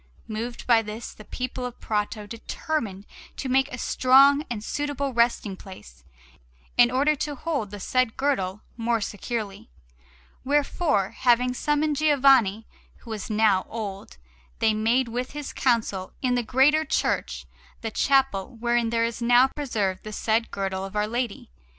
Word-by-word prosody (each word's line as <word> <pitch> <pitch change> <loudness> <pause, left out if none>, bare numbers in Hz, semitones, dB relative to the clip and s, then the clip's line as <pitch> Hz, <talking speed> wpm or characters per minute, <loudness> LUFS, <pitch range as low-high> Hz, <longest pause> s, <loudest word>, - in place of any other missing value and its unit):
Moved 230 +2 -5
by 235 -2 +5
this, 220 +2 -7
the 215 - -13
people 255 +2 -5
of 250 -1 -6
Prato 210 0 -2
determined 220 -2 -4 0.3
to 270 - -4
make 265 +2 +2
a 255 - -5
strong 275 +4 +5
and 220 -3 -4
suitable 285 +1 -2
resting 235 -4 +1
place, 105 - -13 0.7
in 245 0 +6
order 280 +5 +2
to 295 +1 -3
hold 280 -7 -3
the 205 0 -8
said 255 +3 0
Girdle 210 -8 -1 0.2
more 230 0 0
securely; 205 - -5 0.7
wherefore, 280 - +1
having 250 +1 +2
summoned 295 +2 0
Giovanni, 270 -8 +4 0.4
who 230 - -9
was 215 0 -5
now 210 -3 +2
old, 200 - -6 0.4
they 220 - +2
made 230 +4 +1
with 245 +3 -4
his 295 -1 -6
counsel, 205 -5 0
in 255 -2 0
the 245 - +2
greater 270 +6 +3
church, - - -1 0.4
the 225 -2 -4
chapel 265 -6 +1
wherein 240 0 +1
there 230 0 +1
is 230 0 -4
now 245 +2 +5
preserved 215 -10 -2
the 215 - -7
said 225 +2 0
Girdle 190 -1 -3
of 195 +1 -7
Our 210 0 +1
Lady. 235 - -4
235 Hz, 150 wpm, -25 LUFS, 210-265 Hz, 0.7 s, in